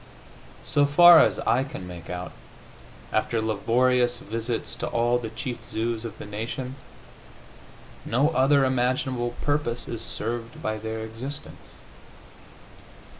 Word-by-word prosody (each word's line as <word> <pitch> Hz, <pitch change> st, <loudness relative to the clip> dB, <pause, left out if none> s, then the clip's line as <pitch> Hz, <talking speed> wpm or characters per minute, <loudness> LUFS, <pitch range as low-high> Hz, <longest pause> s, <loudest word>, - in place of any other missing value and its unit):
So 145 Hz, 0 st, +3 dB
far 175 Hz, +3 st, +9 dB
as -, -, +4 dB
I 130 Hz, +3 st, +2 dB
can 115 Hz, -9 st, -7 dB
make 85 Hz, -1 st, -9 dB
out, 90 Hz, 0 st, -5 dB, 0.8 s
after 110 Hz, +1 st, +1 dB
laborious 120 Hz, +3 st, +2 dB
visits 115 Hz, +1 st, -3 dB
to -, -, -3 dB
all 120 Hz, +1 st, +1 dB
the 115 Hz, -2 st, -5 dB
chief 120 Hz, +2 st, -5 dB
zoos 115 Hz, +1 st, -2 dB
of 115 Hz, -, -7 dB
the -, -, -8 dB
nation, 115 Hz, +5 st, -5 dB, 1.3 s
no 135 Hz, +6 st, +2 dB
other 135 Hz, -1 st, +4 dB
imaginable 125 Hz, -1 st, 0 dB
purpose 145 Hz, -5 st, -1 dB
is 115 Hz, -1 st, -5 dB
served 115 Hz, +1 st, -5 dB
by 110 Hz, 0 st, -2 dB
their 110 Hz, +1 st, -4 dB
existence. 125 Hz, +6 st, -8 dB
120 Hz, 125 wpm, -25 LUFS, 110-130 Hz, 1.3 s, far